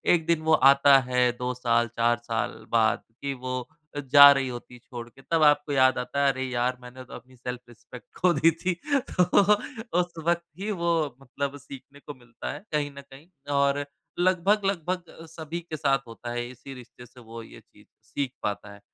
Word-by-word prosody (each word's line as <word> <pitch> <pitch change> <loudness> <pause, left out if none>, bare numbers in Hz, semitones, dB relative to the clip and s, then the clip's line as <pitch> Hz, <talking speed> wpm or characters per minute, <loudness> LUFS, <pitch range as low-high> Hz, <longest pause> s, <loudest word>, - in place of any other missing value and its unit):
एक 165 -2 -3
दिन 165 -1 +1
वो 160 0 +2
आता 140 0 +6
है 125 -1 +3
2 125 0 -2
साल, 120 -1 +1
4 120 +1 +1
साल 120 -1 -4
बाद 115 -1 +2 0.2
की 140 0 -2
वो 130 0 -4 0.4
अ, - - -3
जा 140 +1 +8
रही 135 -1 +1
होती 125 0 -8
है 125 - -13
छोड़ 120 0 -9
के, 135 - -19
तब 165 +2 0
आपको 145 0 +3
याद 130 -1 +4
आता 140 +3 -2
है, 140 - +5
अरे 130 0 -5
यार 125 +1 -1
मैंने 125 +1 -11
तो - - -14
अपनी 130 0 -12
सेल्फ 125 0 -6
रिस्पेक्ट 120 +1 -14
खो 180 -1 +3
दी 165 0 +4
थी 175 +3 -2 0.4
तो 180 - +2 0.8
उस 175 -1 -2
वक़्त 170 0 +1 0.2
ही 205 - -4
वो 170 -3 -1 0.3
मतलब 140 +2 -5
सीखने 140 +1 -13
को 145 - -9
मिलता 120 -2 -8
है - - -8
कहीं 145 -1 -1
न - - -7
कहीं 140 +3 -16 0.3
और 140 0 +1 0.3
लगभग 185 +3 +2
लगभग 180 -3 -3
सभी 165 +1 -6
के 165 -2 -8
साथ 135 -1 +2
होता 115 +1 -9
है, 120 0 -3
इसी 130 +2 -11
रिश्ते 125 -1 -13
से 125 +1 -18
वो 115 -1 -10
ये - - -14
चीज़ - - -23 0.2
सीख 140 -3 -3
पाता 105 0 -4
है 100 - -15
135 Hz, 205 wpm, -26 LUFS, 125-155 Hz, 0.8 s, जा